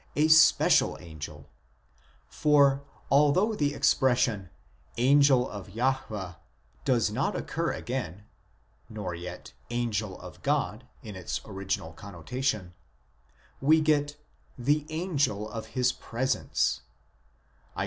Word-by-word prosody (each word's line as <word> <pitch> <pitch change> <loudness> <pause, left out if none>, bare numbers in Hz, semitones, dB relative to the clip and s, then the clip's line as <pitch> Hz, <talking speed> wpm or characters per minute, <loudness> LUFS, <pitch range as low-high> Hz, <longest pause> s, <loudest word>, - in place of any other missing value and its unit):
a 150 +2 +3
special 155 -1 +5
angel; 75 -3 -9 0.8
for, 140 -2 +3 0.3
although 150 +10 +4
the 145 -8 0
expression 120 -8 +2 0.2
" - - -32 0.2
angel 135 0 +4
of 100 -2 -8
Jahwe 110 -5 -2 0.2
" - - -32
does 115 -4 +2
not 130 +7 -1
occur 165 +1 -2
again 110 -7 -5 0.7
(nor 105 -5 -5
yet 90 +1 -8
" - - -34
angel 110 -5 -2
of 90 - -12
God" 130 -5 -1 0.2
in 105 -4 -8
its 90 -2 -4
original 95 -5 -4
connotation), 100 - -4 0.9
we 155 +4 +5
get 150 -1 +1 0.4
"the 145 +4 +1
angel 150 - -1
of 110 +1 -7
his 125 0 +3
presence" 130 +3 -1 1.0
(Isa. - - -3
125 Hz, 115 wpm, -28 LUFS, 100-145 Hz, 1.0 s, special